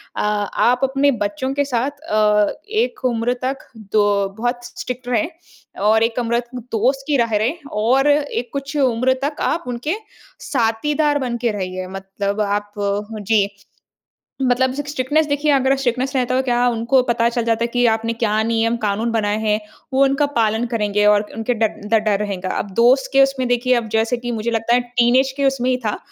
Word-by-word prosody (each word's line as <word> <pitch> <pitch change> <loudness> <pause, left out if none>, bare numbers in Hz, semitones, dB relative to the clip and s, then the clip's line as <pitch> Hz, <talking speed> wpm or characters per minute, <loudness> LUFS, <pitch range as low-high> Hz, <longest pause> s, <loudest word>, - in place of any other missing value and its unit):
अ, - - -2
आप 210 +4 +1
अपने 270 +1 +3
बच्चों 205 +7 -3
के 285 +1 0
साथ 255 0 0
अ, 210 -7 +2 0.2
एक 445 - -1
उम्र 240 0 +1
तक 265 +1 -1 0.2
द 215 0 +1 0.3
बहुत 240 +1 -2
स्ट्रिक्ट 245 0 -7
रहें 240 -1 +1 0.6
और 220 +1 +4
एक 230 +1 0
उम्र 235 0 +1 0.2
दोस्त 250 +3 -1
की 295 -2 +2
रह 230 -3 +1
रहें 240 +10 0 0.2
और 260 +5 +3
एक 285 -4 0
कुछ 280 +1 -5
उम्र 255 -1 +2
तक 290 +1 -1 0.2
आप 340 +2 -2
उनके 250 +8 -2 0.6
साथीदार 290 +5 +1
बन 245 -3 -2
के 235 -1 0
रहिए, 185 -2 -4
मतलब 195 +2 -4
आप 205 0 -1 0.5
जी। 205 0 +2 1.0
मतलब 255 0 +2
सिक 290 +1 -5
स्ट्रिक्टनेस 290 +3 +1
देखिए 290 +1 0
अगर 270 -1 +3
स्ट्रिक्टनेस 260 +1 -1
रहता 255 0 +1
तो 260 - +2
क्या 245 -1 +2
उनको 240 +2 +2
पता 235 0 +2
चल 235 0 -2
जाता 230 0 0
है - - +2
कि 245 0 +2
आपने 225 +1 0
क्या 220 -2 0
नियम-कानून 225 -1 0
बनाए 210 -2 0
हैं? 215 -1 +1 0.3
वो 265 +1 +3
उनका 275 +2 +2
पालन 225 -1 +1
करेंगे 210 -2 +1
और 210 0 +5
क - - -13
उनके 225 +2 -1
ड 220 -1 +2 0.3
ड - - +6
डर 210 -2 +2
रहेगा। 195 -3 -3
अब 205 - -4
दोस्त 255 +4 +4
के 275 0 +6
उसमें 270 -1 +1
देखिए, 245 +1 +2
अब 235 -2 -1
जैसे 225 +3 +1
कि 240 0 -5
मुझे 230 +1 -2
लगता 225 +1 +1
है 245 - +4
टीनेज 245 +2 +2
के 280 - -1
उसमें 260 -2 +1
ही 255 - +2
था 210 - -1
240 Hz, 190 wpm, -20 LUFS, 220-265 Hz, 1.0 s, ड